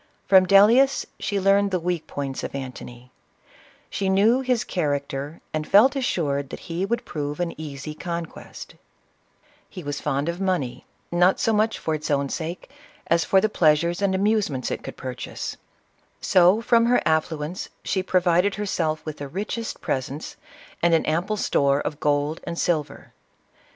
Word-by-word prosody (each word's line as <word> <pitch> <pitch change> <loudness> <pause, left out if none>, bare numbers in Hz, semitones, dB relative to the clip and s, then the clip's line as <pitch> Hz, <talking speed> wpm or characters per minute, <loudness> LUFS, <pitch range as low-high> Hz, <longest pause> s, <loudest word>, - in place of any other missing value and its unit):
From 190 -1 +6
Dellius 230 +8 +5
she 200 - -1
learned 200 +1 +3
the 185 -2 0
weak 175 -1 -2
points 135 -2 -4
of - - -5
Antony: 125 -2 -8 0.8
she 195 -1 -2
knew 210 +6 +4
his 250 -3 0
character, 145 -2 -3
and 155 -1 -2
felt 225 +8 +6
assured 145 - -1
he 175 +2 -4
would 235 +2 -2
prove 145 -1 -4
an 175 -1 -1
easy 145 -1 -6
con 170 +1 -4
quest, - - -11 1.0
lie 180 - -6
was 145 0 -4
fond 140 0 -1
of 170 +2 -3
money, 180 -10 -2 0.2
not 180 +2 +3
so 225 - +2
much 215 +1 +1
for 160 - -2
its 155 0 -4
own 140 -1 +1
sake, 165 +4 -5 0.4
as 170 0 +2
for 195 - +4
the 215 - +2
pleasures 170 -2 +2
and 195 -1 +1
amusements 195 - 0
it - - -3
could - - -9
purchase; 130 -1 -6 0.3
— - - -42 0.2
so 185 +3 +4
from 235 0 +3
her 245 - +4
affluence, 160 +2 -1
she 190 - 0
provided 185 +1 +2
herself 165 -6 -2
with 155 -1 -5
the 145 - -6
richest 210 +8 -4
presents, 135 +3 -4 0.5
and 170 -1 +4
an 160 - +1
ample 175 +7 0
store 140 -7 +2
of 145 0 -4
gold 145 +2 0
and 170 - -5
silver. 160 -5 -2
170 Hz, 160 wpm, -24 LUFS, 150-195 Hz, 1.0 s, From